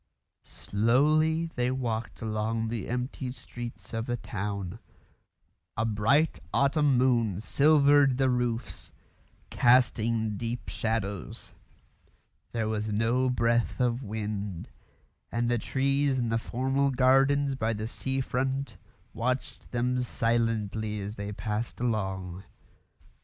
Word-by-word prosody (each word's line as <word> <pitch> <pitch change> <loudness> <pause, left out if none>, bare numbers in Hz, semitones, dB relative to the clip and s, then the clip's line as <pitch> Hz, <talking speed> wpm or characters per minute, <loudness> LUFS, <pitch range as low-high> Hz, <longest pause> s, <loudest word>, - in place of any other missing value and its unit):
Slowly 155 +9 +2
they 125 0 0
walked 120 -4 -3
along 110 +1 -1
the 115 -3 -4
empty 125 +1 -3
streets 120 -5 -8
of 115 0 -2
the 120 -1 -1
town; 100 -2 -4 1.0
a 110 - +1
bright 115 +9 +2
autumn 140 -1 +3
moon 120 -6 +2
silvered 140 +1 +4
the 135 0 +3
roofs, 120 -1 -2 0.6
casting 115 -3 +3
deep 120 +2 -4
shadows; 105 -4 -3 1.0
there 115 -2 -1
was 110 0 -2
no 115 +5 +2
breath 120 -1 +1
of 125 0 +1
wind; 105 -5 -4 0.6
and 120 0 0
the 120 - +2
trees 135 +2 +1
in 120 -2 0
the 115 0 +1
formal 135 +4 0
gardens 135 +2 +3
by 115 -4 -1
the 110 0 -3
sea 130 +3 -2
front 130 0 -2 0.4
watched 125 +3 -3
them 125 +1 0
silently 115 -3 0
as 100 +2 -5
they 100 0 -5
passed 105 +2 -3
along. 95 -6 -2
120 Hz, 115 wpm, -28 LUFS, 110-130 Hz, 1.0 s, silvered